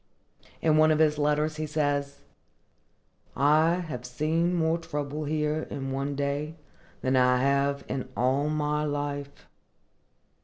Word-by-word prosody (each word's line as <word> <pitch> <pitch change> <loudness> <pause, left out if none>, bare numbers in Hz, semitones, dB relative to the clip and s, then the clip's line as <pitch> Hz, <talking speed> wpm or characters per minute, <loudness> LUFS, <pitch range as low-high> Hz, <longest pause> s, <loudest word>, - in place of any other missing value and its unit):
In 155 -1 +4
one 155 0 +6
of 155 - +3
his 155 -1 +3
letters 150 +1 +1
he 155 0 -3
says, 145 -2 -1 1.1
"I 155 +4 +4
have 125 -5 -6
seen 155 +8 0
more 165 0 +1
trouble 150 -1 -4
here 150 +1 -1
in 135 -1 -4
one 140 +1 -2
day 145 +3 -2 0.5
than 130 +1 +1
I 125 0 +4
have 140 +1 +1
in 130 -1 -4
all 135 +4 +1
my 150 0 0
life." 145 -1 -4
145 Hz, 130 wpm, -27 LUFS, 140-155 Hz, 1.1 s, one